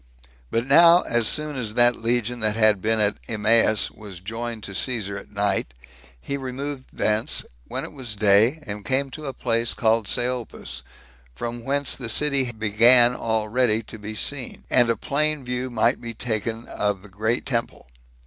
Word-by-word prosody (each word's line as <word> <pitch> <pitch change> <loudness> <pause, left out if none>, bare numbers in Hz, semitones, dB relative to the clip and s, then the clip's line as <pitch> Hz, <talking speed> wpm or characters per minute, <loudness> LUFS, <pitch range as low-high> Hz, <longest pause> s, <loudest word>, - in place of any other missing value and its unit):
But 115 +1 -1
now, 170 +5 +7
as 120 -2 0
soon 150 -1 -1
as 115 -4 -3
that 120 0 +5
legion 120 +1 -1
that 110 -1 0
had 110 -3 +3
been 110 +2 +1
at 105 -1 +1
Emmaus 110 0 +2
was 100 -5 -11
joined 115 +3 -6
to 100 - -5
Caesar 105 -2 -1
at 100 - -9
night, 100 -11 -1 0.4
he 140 - -4
removed 135 +1 -5
thence, 105 +1 -1 0.2
when - - -4
it - - -8
was 125 -6 -5
day, 105 +9 +3
and 105 -2 -6
came 135 +3 0
to 155 0 -7
a - - -2
place 115 -2 -1
called 110 -2 +1
Seopus; 120 - -3 0.5
from 120 +4 -5
whence 140 +1 0
the 125 -4 -6
city 140 0 +1
began 120 +3 +5
already 110 0 0
to 110 - -11
be 105 +1 -7
seen, 135 +3 -3
and 120 -2 +4
a 115 - +1
plain 150 +2 -1
view 125 +1 -3
might 120 +1 +1
be 115 -1 -7
taken 115 0 -3
of 100 -2 -2
the - - -12
great 110 +4 -1
temple. 115 -3 -3
115 Hz, 170 wpm, -23 LUFS, 110-125 Hz, 0.5 s, now